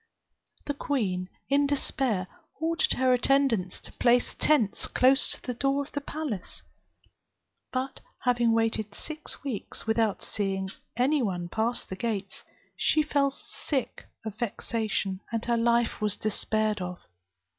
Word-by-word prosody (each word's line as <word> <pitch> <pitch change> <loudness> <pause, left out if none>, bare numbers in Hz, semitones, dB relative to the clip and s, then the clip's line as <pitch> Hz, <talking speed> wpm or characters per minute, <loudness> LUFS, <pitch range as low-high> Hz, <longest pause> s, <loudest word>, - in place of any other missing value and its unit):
The 285 - -1
queen, 195 -11 -1 0.2
in 285 +1 +3
despair, 265 -8 +1 0.3
ordered 325 0 +2
her 255 0 +3
attendants 250 -7 +2
to - - -10
place 245 0 +3
tents 255 -10 +2
close 265 +2 +4
to - - -3
the 250 - -3
door 275 +3 +1
of 280 - -14
the 285 - -3
palace; 280 - -5 1.1
but 260 +1 -2 0.2
having 240 -2 +3
waited 225 -2 0
six 310 -2 -5
weeks, 255 -8 -4
without 220 -2 +1
seeing 195 -2 -1 0.3
any 275 +4 +3
one 180 -6 -2
pass 225 +5 0
the 190 - -6
gates, 200 -2 -3 0.3
she 310 - +3
fell 285 -2 +2
sick 275 0 -4 0.2
of 215 0 -6
vexation, 215 -4 -1
and 230 -1 -2
her 235 - +2
life 235 0 +2
was 210 -2 +2
despaired 215 -1 +1
of. 180 0 -6
235 Hz, 135 wpm, -28 LUFS, 210-275 Hz, 1.1 s, close